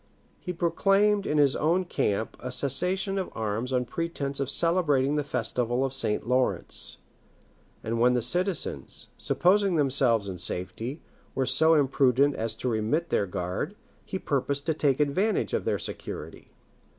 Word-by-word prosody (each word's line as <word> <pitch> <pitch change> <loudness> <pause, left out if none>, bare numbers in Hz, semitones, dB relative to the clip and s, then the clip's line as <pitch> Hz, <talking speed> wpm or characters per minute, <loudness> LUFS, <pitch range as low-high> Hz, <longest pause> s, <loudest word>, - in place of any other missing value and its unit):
He 180 - -5
proclaimed 195 +4 +2
in 150 - 0
his 140 -2 +4
own 175 +4 +1
camp 110 - -1
a 125 - -5
cessation 180 +9 0
of 185 - -3
arms 110 +3 -2
on 125 -1 +1
pretence 140 -2 -3
of 135 -1 -1
celebrating 150 -4 +2
the 150 - 0
festival 125 -1 -1
of 135 - -3
St. 115 -5 -1
Laurence; 125 +1 -1 0.9
and 115 +1 -2
when 125 +1 +4
the 125 - +1
citizens, 180 - -1
supposing 195 +1 +3
themselves 130 -7 +2
in 95 -2 -6
safety, 110 - -4 0.3
were 135 - +1
so 160 +4 +5
imprudent 135 -1 +3
as 110 0 -3
to 125 - -4
remit 120 +9 0
their 100 - +1
guard, 90 - -3 0.3
he 190 - -4
purposed 140 -3 -1
to 160 - +1
take 145 -3 +1
advantage 185 +9 +1
of - - -1
their - - +1
security. - - -7
140 Hz, 150 wpm, -27 LUFS, 125-170 Hz, 0.9 s, so